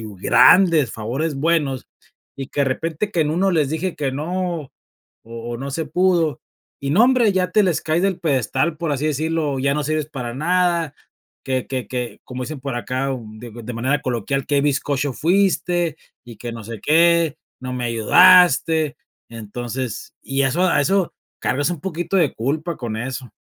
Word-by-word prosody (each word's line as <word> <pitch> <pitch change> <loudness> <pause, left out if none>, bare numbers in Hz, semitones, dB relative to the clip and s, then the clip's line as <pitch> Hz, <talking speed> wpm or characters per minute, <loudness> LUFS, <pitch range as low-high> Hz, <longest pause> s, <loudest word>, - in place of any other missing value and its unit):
y - - -7 0.2
grandes, 155 - +5
favores 135 +9 -3
buenos, 145 -3 0 0.5
y 135 -1 -6
que 145 - -3
de - - +3
repente 160 +8 -2
que 175 - 0
en 150 -1 +1
1 190 +4 +1
les 155 -5 +2
dije 165 +3 -2
que 140 -2 -1
no, 170 +3 -2
o 135 - -15 0.8
o 120 - -3
no 135 +2 -5
se 160 +3 -2
pudo. 170 -1 +1 0.4
Y 140 - -2
no 200 +11 +5
hombre, 245 -5 +3
ya 185 -1 0
te 210 - +5
les 170 -4 +1
caes 160 +2 0
del 195 -2 +1
pedestal, 145 +1 0
por 165 0 -3
así 145 +2 -1
decirlo, 155 -1 -1
ya 140 +1 +1
no 150 - -1
sirves 155 0 -1
para 125 -5 -5
nada, 170 0 +1 0.5
que 130 -2 -1
que 130 -2 -4
que, 125 -2 -4
como 125 0 -6
dicen 150 +1 -7
por 135 -1 -4
acá 130 +3 -2
o 125 - -7 0.2
de 120 +1 -9
de 120 +1 -7
manera 135 +5 0
coloquial, 130 +2 -2
qué 145 -1 +2
bizcocho 145 -1 0
fuiste 175 -1 +1 0.3
y 120 -3 -10
que 120 +2 -6
no 115 -1 -8
sé 115 -1 -7
qué, 165 0 +3 0.3
no 130 - -4
me 125 - -3
ayudaste. 160 - +5 0.3
Entonces, 120 +2 -6
y 135 0 -1
eso 135 +7 +1
a - - +2
eso 190 +4 +1 0.3
cargas 145 +5 0
un 170 -5 -4
poquito 175 +1 -2
de 160 -5 +2
culpa 155 +8 -2
con 115 -3 -5
eso. 125 0 -5
145 Hz, 185 wpm, -21 LUFS, 130-170 Hz, 0.8 s, grandes